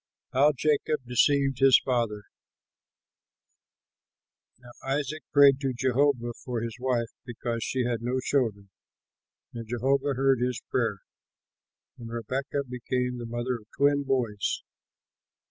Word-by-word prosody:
HOW 145 +3 +5
JACOB 150 -1 0
DECEIVED 135 +2 +2
HIS 135 -1 +7
FATHER 115 -5 -1 2.3
Now 120 0 -15
Isaac 145 +3 -2
prayed 140 -2 +6
to 135 -2 -1
Jehovah 130 -1 +1
for 120 -3 -3
his 115 -1 -4
wife, 125 -2 -1
because 120 -1 -4
she 130 -1 -1
had 120 -2 -1
no 125 +2 -1
children; 110 -8 -1 0.8
and 115 -1 -7
Jehovah 135 +3 +1
heard 135 0 +3
his 125 -1 0
prayer, 110 -6 0 1.0
and 115 -1 -8
Rebekah 130 +5 -3
became 125 0 -2
the 120 - -6
mother 120 +2 -2
of 105 - -21
twin 140 +1 +3
boys. 125 -7 -1
125 Hz, 120 wpm, -27 LUFS, 120-135 Hz, 2.3 s, HIS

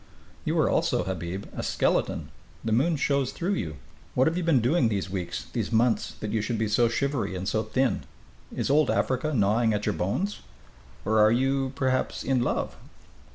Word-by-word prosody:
"You - - 0
are - - +4
also, - - +1
Habib, 95 +1 -4
a - - -3
skeleton. - - 0 0.4
The 110 - 0
moon 140 +9 +3
shows 140 -2 +1
through 180 +4 -1
you. 80 - -3 0.4
What 130 - +4
have 160 - +1
you 180 - 0
been 165 -6 +4
doing 125 +1 +2
these 100 -3 -2
weeks, 90 -3 -4
these - - -2
months, 115 +1 +2
that 105 - -3
you 110 - +1
should 115 +2 -2
be 110 0 0
so 115 +3 +3
shivery 135 -5 -1
and 95 +1 -4
so 110 - +1
thin? 120 +4 0 0.5
Is - - -1
it - - +4
Old 150 -2 +4
Africa 130 +4 0
gnawing 110 -2 +2
at 105 - -2
your 105 - +1
bones? 175 - -2 0.7
Or 110 +2 +3
are 105 0 +6
you, 135 +2 +1
perhaps, 130 -1 0
in 130 -2 +1
love?" 120 - -1
120 Hz, 195 wpm, -27 LUFS, 105-135 Hz, 0.7 s, are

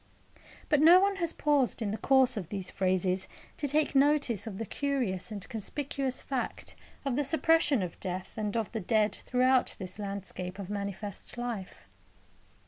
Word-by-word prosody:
But 300 -2 +3
no 340 +4 +9
one 395 +1 +2
has 340 -3 +1
paused 290 -7 +1
in 215 -4 -1
the 215 - -2
course 265 0 +4
of 190 -7 -5
these 190 -3 -4
phrases 185 0 0 0.3
to 290 - -1
take 300 +2 +2
notice 280 -6 +2
of 200 -4 -5
the 225 - -3
curious 240 -7 -2
and 200 -3 -6
conspicuous 265 +3 -3
fact 265 -3 -4 0.3
of 270 -3 0
the 290 - +1
suppression 290 - +3
of 175 - -6
death 185 0 -4
and 215 0 -2
of 225 -3 -2
the 225 - -3
dead 215 +2 +2
throughout 255 +1 +2
this 190 +2 -7
landscape 195 -2 -5
of 200 -1 -6
manifest 200 +1 -4
life. 235 -6 -5
230 Hz, 165 wpm, -30 LUFS, 195-275 Hz, 0.3 s, no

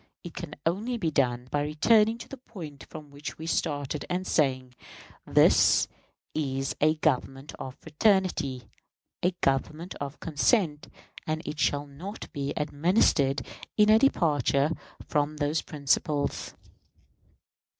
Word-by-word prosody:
It 175 - -8
can 155 -4 -7
only 210 +9 0
be 170 -8 -1
done 125 -3 +1
by 145 - +1
returning 210 +10 +3
to - - -10
the - - -8
point 170 - -10
from 150 -2 -10
which 140 -3 -7
we 160 - -7
started, 145 -3 -1
and 180 +1 -1
saying, 130 -6 +1 0.5
"This - - +5 0.5
is 135 -3 -2
a 155 +1 +4
Government 135 -2 -1
of 130 -1 -6
fraternity, 160 - +1 0.6
a 180 - +3
Government 155 +6 0
of 140 +1 -5
consent, 155 - +1 0.4
and 155 0 -2
it 150 - -5
shall 145 0 +1
not 165 +10 -9
be 140 -2 -2
administered 150 -2 +2 0.3
in 210 0 +6
a 220 - +7
departure 150 - +2 0.4
from 150 0 0
those 150 +2 0
principles." 145 0 -1
150 Hz, 130 wpm, -28 LUFS, 140-175 Hz, 0.6 s, a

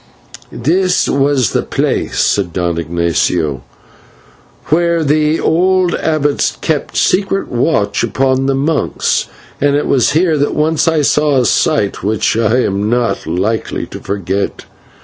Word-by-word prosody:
"This 180 +9 +1
was 135 -4 +1
the - - 0
place," - - -2
said 95 -4 +1
Don 85 -2 -1
Ignatio, 85 -3 -1 1.1
"whence 170 0 +1
the 150 +2 +1
old 180 +2 +2
abbots 150 -2 0
kept 155 -3 -2
secret 195 +1 +1
watch 120 -5 0
upon 130 +3 0
the 135 - +1
monks, 145 +3 0 0.3
and 145 0 +2
it 145 - 0
was 130 -2 +2
here 160 -1 +2
that 145 - 0
once 155 +2 +1
I 160 -2 +2
saw 150 0 +2
a 125 - +2
sight 115 -9 +1
which 105 +2 0
I 115 +2 +2
am 100 -1 -1
not 120 -6 -1
likely 95 +7 -2
to - - -9
forget." 100 0 -3
135 Hz, 135 wpm, -14 LUFS, 100-155 Hz, 1.1 s, old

